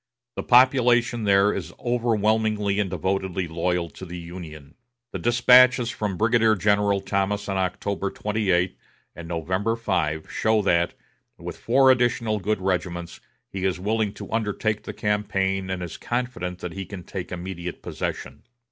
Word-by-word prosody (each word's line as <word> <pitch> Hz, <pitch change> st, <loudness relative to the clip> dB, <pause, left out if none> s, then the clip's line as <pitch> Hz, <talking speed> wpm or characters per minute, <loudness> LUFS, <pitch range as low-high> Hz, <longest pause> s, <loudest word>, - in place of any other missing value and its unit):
The -, -, -2 dB
population 120 Hz, -2 st, +4 dB
there 100 Hz, +1 st, +4 dB
is 90 Hz, -3 st, -5 dB
overwhelmingly 110 Hz, -3 st, +1 dB
and 100 Hz, -2 st, 0 dB
devotedly 95 Hz, 0 st, -2 dB
loyal 85 Hz, +1 st, -1 dB
to -, -, -12 dB
the 90 Hz, -1 st, -7 dB
Union. 85 Hz, -4 st, -9 dB, 0.4 s
The -, -, -4 dB
despatches 125 Hz, 0 st, +5 dB
from 105 Hz, -5 st, -3 dB
Brigadier 110 Hz, 0 st, +3 dB
General 100 Hz, 0 st, +2 dB
Thomas 100 Hz, +1 st, -1 dB
of 100 Hz, -1 st, -1 dB
October 95 Hz, +2 st, -2 dB
28 95 Hz, -5 st, 0 dB, 0.4 s
and 85 Hz, -1 st, -9 dB
November 95 Hz, +7 st, -1 dB
5 85 Hz, -9 st, -1 dB
show 110 Hz, -1 st, +1 dB
that, 85 Hz, -3 st, +2 dB, 0.4 s
with -, -, -7 dB
four 130 Hz, +2 st, +4 dB
additional 120 Hz, -4 st, +1 dB
good 105 Hz, +1 st, -1 dB
regiments, 90 Hz, -2 st, -2 dB, 0.3 s
he 95 Hz, -1 st, -6 dB
is 95 Hz, -1 st, 0 dB
willing 105 Hz, +2 st, 0 dB
to -, -, -9 dB
undertake 110 Hz, -1 st, -1 dB
the -, -, -5 dB
campaign 95 Hz, -2 st, -1 dB
and 95 Hz, -1 st, -3 dB
is 85 Hz, -, -7 dB
confident 120 Hz, -8 st, -4 dB
he 95 Hz, -2 st, -6 dB
can 95 Hz, -3 st, -8 dB
take 90 Hz, 0 st, -6 dB
immediate 90 Hz, -1 st, -6 dB
possession. 70 Hz, +2 st, -5 dB
100 Hz, 145 wpm, -24 LUFS, 90-110 Hz, 0.4 s, despatches